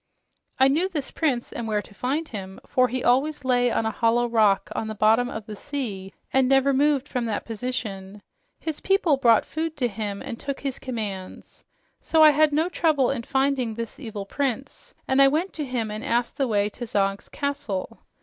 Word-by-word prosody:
"I 265 - +6
knew 325 +8 +2
this 295 -7 -4
prince 265 -7 -1
and 230 - -4
where 210 -1 0
to - - -16
find 275 +9 -2
him, 190 -5 -7
for 255 0 +3
he 255 0 -3
always 270 +3 +2
lay 245 -1 +3
on 225 - 0
a 220 - 0
hollow 235 +2 +2
rock 215 -4 +2
on 220 - -3
the 215 - -5
bottom 225 +4 +3
of 220 -3 -6
the 215 -1 -7
sea 205 -8 -5 0.2
and 265 -1 +4
never 270 0 +4
moved 285 0 +2
from 250 -4 -2
that 220 -2 -2
position. 210 -4 -5 0.4
His 315 -2 -4
people 385 -7 +3
brought 235 -4 +4
food 320 0 -4
to 250 -3 +1
him 205 -2 -5
and 230 - -6
took 280 -1 -4
his 275 -2 -3
commands. 210 -7 -6 0.4
So 320 -1 +4
I 305 - +9
had 305 +1 +4
no 310 +3 +2
trouble 310 -7 +2
in 270 -4 -2
finding 265 -2 0
this 230 0 -6
evil 215 -7 -6
prince, 275 +4 -4
and 265 +1 +4
I 275 - +8
went 320 +7 0
to 300 - -4
him 240 -4 -2
and 215 +1 -5
asked 235 +1 0
the 270 - 0
way 205 -3 +2
to 240 +3 -7
Zog's 195 -1 -1
castle. 235 -7 -4
245 Hz, 200 wpm, -25 LUFS, 220-280 Hz, 0.4 s, I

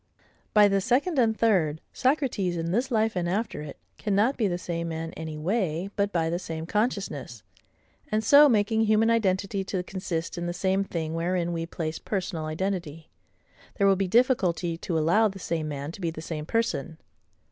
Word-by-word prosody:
By 210 -1 +8
the 195 -1 +2
second 270 - +1
and 220 -3 +3
third, 170 -9 +2
Socrates, 255 - 0
in 165 0 -2
this 245 +7 0
life 220 -3 +1
and 175 -1 -1
after 205 -2 -2
it, 150 -1 -8 0.2
cannot 210 +6 +2
be 220 - +1
the 175 -2 -1
same 170 -1 -4
man 165 0 -5
any 160 -1 -6
way, 180 +1 -1
but 200 -1 0
by 165 -3 +1
the 170 +2 -1
same 160 -3 -5
consciousness; 195 - -2 0.7
and 215 +1 +1
so 285 +6 +8
making 220 0 +2
human 220 +1 +3
identity 195 -3 +1
to 185 -2 -2
consist 175 -3 -4
in 175 - -3
the 175 - -2
same 190 +2 +1
thing 160 -4 -4
wherein 175 +1 -1
we 165 0 -3
place 160 -2 -4
personal 180 -5 -3
identity, 165 -1 -4 0.6
there 200 - +2
will 195 0 +5
be 195 0 -1
difficulty 185 -7 +2
to 165 0 -3
allow 175 +8 +4
the 195 -1 -6
same 165 -4 -3
man 145 0 -4
to 195 - -11
be 170 - 0
the 160 - -7
same 160 -1 -5
person. 200 - -1
185 Hz, 185 wpm, -27 LUFS, 165-215 Hz, 0.7 s, By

